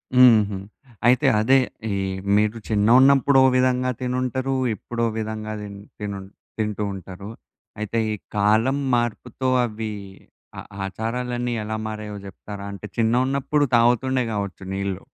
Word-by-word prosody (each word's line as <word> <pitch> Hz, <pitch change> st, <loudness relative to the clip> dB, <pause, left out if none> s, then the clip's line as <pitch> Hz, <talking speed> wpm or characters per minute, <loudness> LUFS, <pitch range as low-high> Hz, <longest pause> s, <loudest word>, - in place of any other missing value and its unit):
హుహు. 110 Hz, -6 st, +6 dB, 0.5 s
అయితే 125 Hz, 0 st, +4 dB
అదే 130 Hz, +5 st, +5 dB, 0.3 s
ఈ -, -, 0 dB, 0.4 s
మీరు 105 Hz, +2 st, +1 dB
చిన్నగున్నప్పుడు 130 Hz, +6 st, +5 dB
ఓ -, -, +7 dB
విధంగా 130 Hz, 0 st, +2 dB
తినుంటరు. 130 Hz, +1 st, -1 dB, 0.2 s
ఇప్పుడో 115 Hz, +2 st, -3 dB
విధంగా 110 Hz, 0 st, -4 dB
దిం 100 Hz, -1 st, -8 dB, 0.2 s
తినుం 100 Hz, -2 st, -5 dB, 0.3 s
తింటూ 105 Hz, -1 st, -2 dB
ఉంటారు. 95 Hz, +1 st, -9 dB, 0.5 s
అయితే 105 Hz, +2 st, -1 dB
ఈ -, -, -1 dB, 0.2 s
కాలం 110 Hz, +6 st, +3 dB, 0.2 s
మార్పుతో 120 Hz, +2 st, -2 dB, 0.2 s
అవి 110 Hz, -1 st, -5 dB, 0.7 s
ఆ -, -, -5 dB, 0.2 s
ఆచారాలన్నీ 120 Hz, +4 st, -3 dB
ఎలా 110 Hz, +1 st, -3 dB
మారయో 105 Hz, -1 st, -5 dB
జెప్తారా? 100 Hz, +1 st, -9 dB
అంటే 100 Hz, +1 st, -8 dB
చిన్నగున్నప్పుడు 130 Hz, +5 st, +1 dB
తాగుతుండే 125 Hz, +2 st, +3 dB
గావచ్చు 100 Hz, -2 st, -4 dB
నీళ్ళు. 100 Hz, -1 st, -3 dB
110 Hz, 120 wpm, -23 LUFS, 105-125 Hz, 0.7 s, ఓ